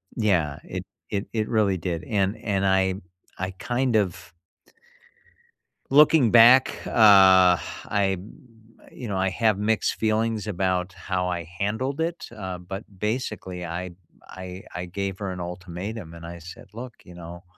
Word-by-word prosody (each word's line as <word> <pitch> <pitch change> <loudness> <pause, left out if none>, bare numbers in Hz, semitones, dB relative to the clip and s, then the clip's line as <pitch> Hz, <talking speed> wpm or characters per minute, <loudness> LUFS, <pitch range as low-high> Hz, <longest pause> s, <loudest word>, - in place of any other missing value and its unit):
yeah. 85 - +1
It - - -6 0.2
it 100 0 -3
it 110 -1 -1
really 105 -4 +2
did. 85 -1 -3
And 100 -1 0
and 100 -2 0
I 95 0 +3 0.5
I 95 0 -2
kind 125 -1 0
of 90 -4 -2 1.6
looking 145 -4 +6
back, 120 +2 +7
uh, - - -5 0.9
I 95 -2 0 0.7
you 125 - -8
know, 100 -3 -2
I 95 0 +1
have 110 +1 +1
mixed 110 +2 0
feelings 110 0 0
about 95 -2 -1
how 90 -1 -2
I 85 -2 -4
handled 130 +9 -2
it, 170 +1 -3
uh, 95 -3 -6
but, 95 +3 -7 0.2
basically, 105 -6 -3
I 85 +2 -5 0.4
I 95 0 -9
I 90 0 -4
gave 95 +1 -4
her 100 -2 -3
an 90 - -6
ultimatum, 90 +2 -6
and 85 0 -10
I 85 +1 -8
said, 90 +3 -11
"Look," 120 +1 -8
you 90 - -14
know, 85 +1 -10
95 Hz, 145 wpm, -25 LUFS, 90-110 Hz, 1.6 s, back